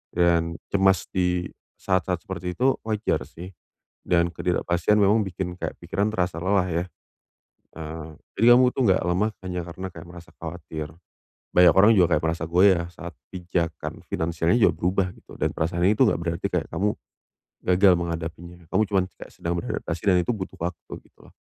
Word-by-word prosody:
dan 85 Hz, -1 st, +2 dB, 0.2 s
cemas 95 Hz, -1 st, +3 dB
di 90 Hz, -1 st, 0 dB, 0.3 s
saat-saat 95 Hz, -2 st, -1 dB
seperti 90 Hz, -1 st, -5 dB
itu 130 Hz, +2 st, +2 dB
wajar 105 Hz, -11 st, -1 dB
sih. 90 Hz, +4 st, -10 dB, 0.5 s
Dan 85 Hz, -1 st, +2 dB
ketidakpastian 90 Hz, +3 st, +1 dB
memang 105 Hz, +2 st, +4 dB
bikin 90 Hz, -1 st, -4 dB
kayak -, -, -4 dB
pikiran 100 Hz, +5 st, -1 dB
terasa 90 Hz, -5 st, -2 dB
lelah 95 Hz, -1 st, +2 dB
ya. 85 Hz, +1 st, -1 dB, 0.9 s
Eee, 80 Hz, 0 st, -7 dB, 0.3 s
jadi 115 Hz, +3 st, +6 dB
kamu 125 Hz, -1 st, +4 dB
itu -, -, -3 dB
nggak 95 Hz, -5 st, +4 dB
lemah 95 Hz, +5 st, +1 dB, 0.2 s
hanya 90 Hz, -1 st, -3 dB
karena 95 Hz, +3 st, -6 dB
kayak 80 Hz, +1 st, -11 dB
merasa 85 Hz, -1 st, -13 dB
khawatir. 80 Hz, -2 st, -7 dB, 0.6 s
Banyak 90 Hz, -2 st, +7 dB
orang 105 Hz, +4 st, +7 dB
juga 90 Hz, -3 st, +4 dB
kayak 75 Hz, -, -2 dB
merasa 80 Hz, 0 st, -1 dB
goyah 90 Hz, 0 st, +4 dB
saat 85 Hz, 0 st, -8 dB, 0.2 s
pijakan 85 Hz, -3 st, -3 dB
finansialnya 85 Hz, +2 st, 0 dB
juga -, -, +5 dB
berubah 90 Hz, +1 st, 0 dB
gitu, -, -, -15 dB
dan -, -, +1 dB
perasaan 85 Hz, +2 st, -1 dB
ini 105 Hz, -, +5 dB
itu -, -, +7 dB
enggak -, -, +1 dB
berarti 85 Hz, +4 st, -2 dB
kayak 90 Hz, -3 st, -1 dB
kamu 100 Hz, +5 st, 0 dB, 0.7 s
gagal 90 Hz, +1 st, +5 dB
menghadapinya. 85 Hz, +1 st, -5 dB
Kamu 110 Hz, -, +3 dB
cuman 95 Hz, -3 st, +2 dB
kayak -, -, -11 dB
sedang 85 Hz, 0 st, -3 dB
beradaptasi 85 Hz, 0 st, -4 dB
dan 90 Hz, -, +5 dB
itu 120 Hz, -, -1 dB
butuh 95 Hz, -3 st, -7 dB
waktu 85 Hz, -2 st, -5 dB, 0.2 s
gitu. -, -, -21 dB
90 Hz, 170 wpm, -24 LUFS, 85-95 Hz, 0.9 s, Banyak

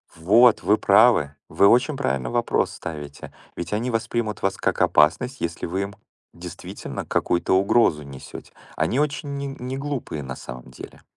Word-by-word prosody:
Вот 105 Hz, +8 st, +4 dB
вы 105 Hz, -, +3 dB
правы! 100 Hz, -9 st, +4 dB
Вы 100 Hz, -, +4 dB
очень 125 Hz, +7 st, +3 dB
правильно 65 Hz, -, -2 dB
вопрос -, -, 0 dB
ставите. 75 Hz, -3 st, -8 dB, 0.2 s
Ведь 85 Hz, +3 st, -5 dB
они 120 Hz, +4 st, -1 dB
воспримут 115 Hz, -2 st, -2 dB
вас 95 Hz, 0 st, 0 dB
как -, -, -1 dB
опасность, 125 Hz, -, +3 dB
если 85 Hz, 0 st, -3 dB
вы 95 Hz, +3 st, -2 dB
им 100 Hz, +1 st, -7 dB, 0.4 s
действительно 85 Hz, 0 st, -8 dB
какую-то 90 Hz, +1 st, 0 dB
угрозу 95 Hz, -5 st, +3 dB
несете. 70 Hz, -1 st, -11 dB, 0.2 s
Они 80 Hz, -, 0 dB
очень 145 Hz, -1 st, -2 dB
не 140 Hz, -, -4 dB
неглупые 135 Hz, -, -5 dB
на 65 Hz, -1 st, -6 dB
самом 60 Hz, +1 st, -10 dB
деле. -, -, -12 dB
100 Hz, 150 wpm, -23 LUFS, 80-125 Hz, 0.4 s, Вот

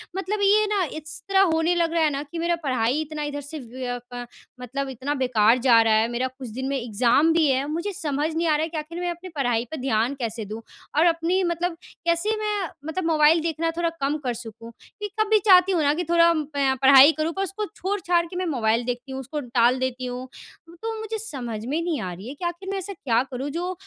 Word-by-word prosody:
मतलब 385 Hz, +2 st, -2 dB
ये 420 Hz, +2 st, +5 dB
ना 410 Hz, -2 st, +1 dB
इस 310 Hz, +1 st, -5 dB
तरह 390 Hz, 0 st, +4 dB
होने 325 Hz, +2 st, +2 dB
लग 335 Hz, -1 st, +1 dB
रहा 330 Hz, -1 st, +2 dB
है 305 Hz, -, +4 dB
ना 280 Hz, +1 st, -3 dB
कि 335 Hz, -, -4 dB
मेरा 340 Hz, +1 st, +1 dB
पढ़ाई 255 Hz, +2 st, +1 dB
इतना 305 Hz, -1 st, -5 dB
इधर 290 Hz, 0 st, -4 dB
से 295 Hz, +2 st, -7 dB
वय 245 Hz, 0 st, -5 dB
क 245 Hz, 0 st, -5 dB, 0.4 s
मतलब 270 Hz, +2 st, -4 dB
इतना 265 Hz, +3 st, -3 dB
बेकार 245 Hz, -4 st, +3 dB
जा 235 Hz, -2 st, +6 dB
रहा 225 Hz, -1 st, +3 dB
है। 220 Hz, +1 st, +3 dB
मेरा 250 Hz, +2 st, -1 dB
कुछ 260 Hz, 0 st, -9 dB
दिन 260 Hz, +4 st, -4 dB
में 275 Hz, -, 0 dB
एग्ज़ाम 245 Hz, +6 st, +2 dB
भी 325 Hz, -2 st, +3 dB
है, 265 Hz, +1 st, +1 dB
मुझे 340 Hz, +7 st, -3 dB
समझ 305 Hz, -3 st, -2 dB
नहीं 335 Hz, +1 st, 0 dB
आ 310 Hz, -, +3 dB
रहा 310 Hz, -, 0 dB
है 325 Hz, -, -2 dB
कि 320 Hz, -, -5 dB
आख़िर 325 Hz, +3 st, -5 dB
मैं 355 Hz, 0 st, -2 dB
अपनी 345 Hz, +2 st, -8 dB
पढ़ाई 245 Hz, -4 st, 0 dB
पे 315 Hz, -, -4 dB
ध्यान 245 Hz, 0 st, +1 dB
कैसे 225 Hz, -2 st, -3 dB
दूँ। 215 Hz, +3 st, -7 dB, 0.4 s
और 320 Hz, -, +5 dB
अपनी 340 Hz, +3 st, +2 dB
मतलब 345 Hz, 0 st, -1 dB, 0.3 s
कैसे 340 Hz, +6 st, +2 dB
मैं 420 Hz, -4 st, -1 dB, 0.2 s
मतलब 325 Hz, +2 st, -3 dB
मोबाइल 315 Hz, 0 st, +4 dB
देखना 330 Hz, 0 st, -1 dB
थोड़ा 340 Hz, -1 st, +1 dB
कम 285 Hz, +3 st, 0 dB
कर 245 Hz, -, -1 dB
सकूँ? 230 Hz, 0 st, -9 dB, 0.3 s
कि 415 Hz, -, -3 dB
कभी 435 Hz, 0 st, +4 dB
चाहती 370 Hz, -1 st, +7 dB
हूँ 340 Hz, -4 st, +2 dB
ना 290 Hz, 0 st, +3 dB
कि 345 Hz, +4 st, -2 dB
थोड़ा 340 Hz, 0 st, +5 dB, 0.2 s
पए 275 Hz, -2 st, +2 dB
पढ़ाई 270 Hz, +2 st, +9 dB
करूँ, 325 Hz, +2 st, -1 dB
पर 385 Hz, -, -2 dB
उसको 390 Hz, +2 st, -3 dB
छोड़-छाड़ 360 Hz, -3 st, 0 dB
के 340 Hz, -, -10 dB
मैं 365 Hz, 0 st, -1 dB
मोबाइल 235 Hz, -6 st, +1 dB
देखती 245 Hz, +2 st, -4 dB
हूँ। 265 Hz, -, -4 dB
उसको 295 Hz, +4 st, -5 dB
टाल 245 Hz, 0 st, +2 dB
देती 255 Hz, 0 st, -2 dB
हूँ 250 Hz, +1 st, -5 dB, 0.5 s
तो 450 Hz, 0 st, -4 dB
मुझे 440 Hz, 0 st, -4 dB
समझ 240 Hz, -, -5 dB
में 300 Hz, +7 st, -1 dB
नहीं 335 Hz, -4 st, -1 dB
आ 185 Hz, -, -4 dB
रही 190 Hz, +6 st, -10 dB
है 265 Hz, -, -6 dB
कि 345 Hz, -, -6 dB
आख़िर 345 Hz, +3 st, -4 dB
मैं 395 Hz, -, -2 dB
ऐसा 390 Hz, +2 st, -5 dB
क्या 245 Hz, -9 st, +1 dB
करूँ 265 Hz, +3 st, -4 dB
जो 355 Hz, +3 st, -3 dB
300 Hz, 240 wpm, -24 LUFS, 255-345 Hz, 0.5 s, पढ़ाई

